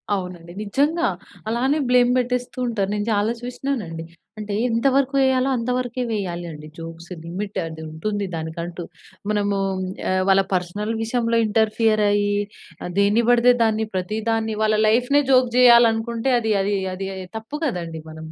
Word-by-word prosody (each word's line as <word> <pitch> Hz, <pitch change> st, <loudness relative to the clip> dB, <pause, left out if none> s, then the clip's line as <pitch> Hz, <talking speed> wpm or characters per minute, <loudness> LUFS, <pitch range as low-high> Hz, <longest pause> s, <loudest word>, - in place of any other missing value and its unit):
అవునండి. 180 Hz, -3 st, -6 dB
నిజంగా 290 Hz, +11 st, +1 dB, 0.4 s
అలానే 260 Hz, +6 st, +1 dB
బ్లేమ్ 250 Hz, 0 st, +5 dB
పెట్టేస్తూ 250 Hz, 0 st, -2 dB
ఉంటారు. 205 Hz, -5 st, -1 dB
నేను 205 Hz, 0 st, -2 dB
చాలా 210 Hz, +2 st, +1 dB
చూసినానండి. 245 Hz, -9 st, -4 dB, 0.4 s
అంటే 210 Hz, -1 st, -4 dB
ఎంతవరకు 270 Hz, +4 st, +2 dB
ఎయ్యాలో, 260 Hz, 0 st, +2 dB
అంత 230 Hz, +1 st, -3 dB
వరకే 250 Hz, 0 st, -3 dB
వేయాలి 180 Hz, -5 st, -3 dB
అండి, 150 Hz, 0 st, -10 dB
జోక్స్ 165 Hz, +1 st, -9 dB
లిమిట్ 195 Hz, +5 st, -5 dB, 0.3 s
ఉంటుంది 205 Hz, +6 st, -3 dB
దానికంటూ. 170 Hz, +2 st, -5 dB, 0.5 s
మనమూ 205 Hz, -1 st, 0 dB, 0.5 s
ఆహ్, 185 Hz, 0 st, +2 dB
వాళ్ళ 195 Hz, 0 st, +6 dB
పర్సనల్ 195 Hz, +5 st, -2 dB
విషయంలో 230 Hz, 0 st, 0 dB
ఇంటర్ఫియర్ 215 Hz, 0 st, +2 dB
అయ్యి, 205 Hz, 0 st, +1 dB, 0.6 s
దేని 205 Hz, +3 st, +3 dB
పడితే 245 Hz, 0 st, +6 dB
దాన్ని, 220 Hz, 0 st, +1 dB
ప్రతి 185 Hz, +4 st, -2 dB
దాన్ని 225 Hz, -1 st, 0 dB
వాళ్ళ 215 Hz, 0 st, +2 dB
లైఫ్‌నే 250 Hz, +6 st, +3 dB
జోక్ 255 Hz, -1 st, +5 dB
చేయాలనుకుంటే, 235 Hz, 0 st, +5 dB
అది, 225 Hz, -1 st, -1 dB
అది, 200 Hz, +1 st, 0 dB, 0.2 s
అది 190 Hz, +1 st, -4 dB, 0.3 s
తప్పు 225 Hz, +6 st, -7 dB
కదండీ! 170 Hz, -, -3 dB
మనము 160 Hz, 0 st, -9 dB
215 Hz, 140 wpm, -22 LUFS, 190-245 Hz, 0.6 s, వాళ్ళ